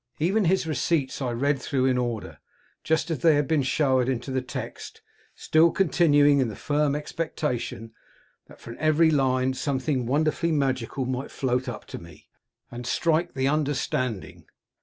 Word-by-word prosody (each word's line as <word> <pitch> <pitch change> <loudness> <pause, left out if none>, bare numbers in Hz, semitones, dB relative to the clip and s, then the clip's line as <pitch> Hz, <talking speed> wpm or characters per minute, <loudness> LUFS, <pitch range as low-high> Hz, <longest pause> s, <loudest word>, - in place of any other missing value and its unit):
Even 195 +6 +1
his 185 +1 +2
receipts 155 -3 -1
I 130 - -1
read 135 +4 0
through 130 -2 0
in 130 -1 +2
order, 120 -3 -3 0.4
just 160 +1 0
as 155 - -2
they 160 +1 +4
had 145 -1 +1
been 155 -1 +2
showered 130 -2 +1
into 130 +1 -3
the 130 0 0
text, 125 - -8 0.3
still 160 +2 +3
continuing 145 -6 +3
in 130 - +2
the 110 - -6
firm 145 -1 0
expectation 150 -7 -4 0.5
that - - -16
from 115 - -10
every 155 +1 +3
line 130 -2 +1
something 130 -2 -2
wonderfully 155 +5 +1
magical 130 -2 -1
might 130 +2 -3
float 125 -1 -1
up 120 - -7
to - - -8
me, 85 -2 -15 0.4
and 120 0 -7
strike 170 +4 0
the 135 0 0
understanding. 135 -7 -2
140 Hz, 160 wpm, -25 LUFS, 130-155 Hz, 0.5 s, they